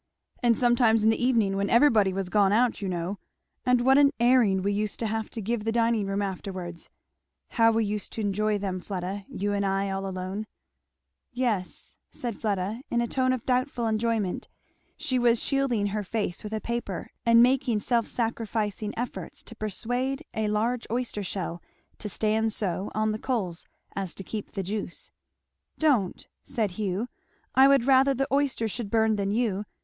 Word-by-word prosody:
and 235 -3 +3
sometimes 240 -3 +4
in 220 - +5
the 225 - -1
evening 225 -6 +2
when 200 +1 0
everybody 230 -6 +5
was 190 0 -3
gone 200 +1 +3
out, 235 +2 +2
you 195 - -2
know; 180 +2 -3 0.5
and 250 -1 +4
what 265 +3 +5
an 285 -1 +7
airing 235 -6 +4
we 200 +1 +1
used 210 0 -2
to 230 - -2
have 220 0 -2
to 225 - -6
give 225 +1 -1
the 225 - 0
dining 230 -3 +2
room 195 +1 -1
afterwards. 185 -3 -5 0.6
How 230 -1 +4
we 225 0 +1
used 205 -1 -4
to 225 - -3
enjoy 210 +1 +1
them, 190 -2 -3
Fleda 190 +1 -5
you 205 +1 -2
and 200 0 0
I 195 0 0
all 195 0 -3
alone." 190 +3 -4 0.8
"Yes," 235 -8 -2
said 240 -7 -5
Fleda 205 +2 -2
in 240 - +1
a 235 - +2
tone 255 +1 +1
of 255 -3 -2
doubtful 250 -1 0
enjoyment. 220 -3 0 0.5
She 260 -5 0
was 235 -1 +4
shielding 270 -7 +1
her 210 -1 -1
face 205 -3 -3
with 210 0 -6
a 220 - -1
paper 235 -6 -4
and 230 0 +6
making 250 -3 +2
self 235 0 +1
sacrificing 220 -3 -2
efforts 245 +1 -5
to 230 - -11
persuade 245 - -2
a 220 -1 -1
large 225 +4 0
oyster 240 -2 -2
shell 180 -3 -4 0.4
to 210 - -5
stand 220 +2 +1
so 190 -1 -2
on 215 0 +1
the 215 - -3
coals 195 -10 -2 0.3
as 195 -3 -3
to 195 - -6
keep 210 +2 -6
the 195 - -2
juice. 200 -1 -5 0.7
"Don't!" 260 - +1
said 225 -7 -1
Hugh; 200 +3 -2 0.5
"I 265 +1 +7
would 275 -3 +4
rather 270 0 +5
the 270 +2 0
oysters 270 -6 +1
should 230 -2 -4
burn 220 -1 +3
than 200 -1 -1
you. 210 -2 0
220 Hz, 180 wpm, -27 LUFS, 200-240 Hz, 0.8 s, an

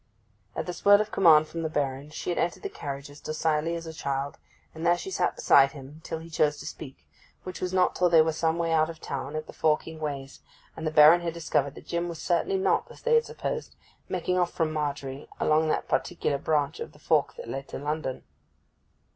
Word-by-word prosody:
At - - -2
this 175 -1 -6
word 205 0 +7
of 215 0 -2
command 155 -4 +6
from 165 - -5
the 160 - -2
Baron 140 -1 -2
she 155 - -4
had - - -1
entered 175 - -1
the 405 - -3
carriage 140 - -6
as 145 - -14
docilely 155 +1 0
as 165 0 -6
a 160 - -7
child, 140 -2 -3 0.3
and 160 - -8
there 175 0 +4
she 385 - -6
sat - - 0
beside 140 - +5
him 145 +2 -11
till - - -4
he 160 +1 -10
chose 150 -2 +1
to - - -9
speak, 135 -4 -9 0.4
which 185 -1 -7
was 180 - -1
not 185 -1 +2
till 180 -1 +3
they 165 -2 +7
were 160 - +1
some 160 +1 0
way 165 -1 0
out 160 0 +3
of 165 -1 -8
the - - -11
town, 140 +2 -4
at 155 - -3
the - - -12
forking 160 +1 0
ways, 140 -3 -5 0.4
and 160 - -4
the - - 0
Baron 155 +3 +8
had 170 -1 -3
discovered 145 -4 0
that - - -12
Jim 170 0 -2
was 170 - -6
certainly 190 - 0
not, 380 - +1
as - - -14
they 475 0 +2
had 465 0 +5
supposed, 485 -2 -5 0.3
making 180 0 0
off 175 -1 +1
from 160 -2 -1
Margery 140 -2 -4
along 155 +1 +3
that 155 - -1
particular 150 -5 -1
branch 150 - 0
of 465 - -7
the - - -18
fork - - +1
that 485 - -9
led 135 0 -5
to - - -6
London. 145 -2 -3
160 Hz, 230 wpm, -27 LUFS, 145-175 Hz, 0.4 s, Baron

